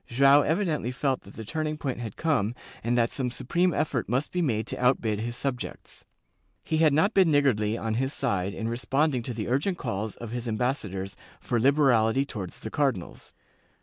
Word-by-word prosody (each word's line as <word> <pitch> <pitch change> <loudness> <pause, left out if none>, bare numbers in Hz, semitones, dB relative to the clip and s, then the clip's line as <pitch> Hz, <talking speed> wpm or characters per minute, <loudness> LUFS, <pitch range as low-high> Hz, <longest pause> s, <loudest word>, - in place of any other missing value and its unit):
Joao 140 +4 +6
evidently 160 - 0
felt 130 +1 -1
that 100 - -15
the 110 - -7
turning 155 +4 -2
point 135 -5 -3
had 115 -4 -6
come 125 -9 +1 0.3
and 120 +2 +1
that 115 -1 +2
some 130 -3 -1
supreme 170 +9 0
effort 145 -6 -1
must 130 +5 0
be 180 - 0
made 110 -9 0
to 125 - -5
outbid 115 -4 +2
his 120 +2 -4
subjects. 135 -3 -5 0.6
He 160 - -1
had 155 -1 +5
not 160 +9 +3
been 190 -4 +5
niggardly, 120 -7 +2
on 110 -1 -2
his 130 +4 0
side, 100 -9 -1
in 110 - -3
responding 135 +3 0
to 120 +1 -5
the 110 - -3
iu*gent 145 +9 0
calls 105 +2 -3
of 115 -2 -8
his 120 0 -4
ambassadors 105 -5 -2 0.2
for 120 - -1
liberality 135 -2 +4
towards 95 -9 -7
the 110 - -6
cardinals. 135 - -2
125 Hz, 185 wpm, -27 LUFS, 110-145 Hz, 0.6 s, Joao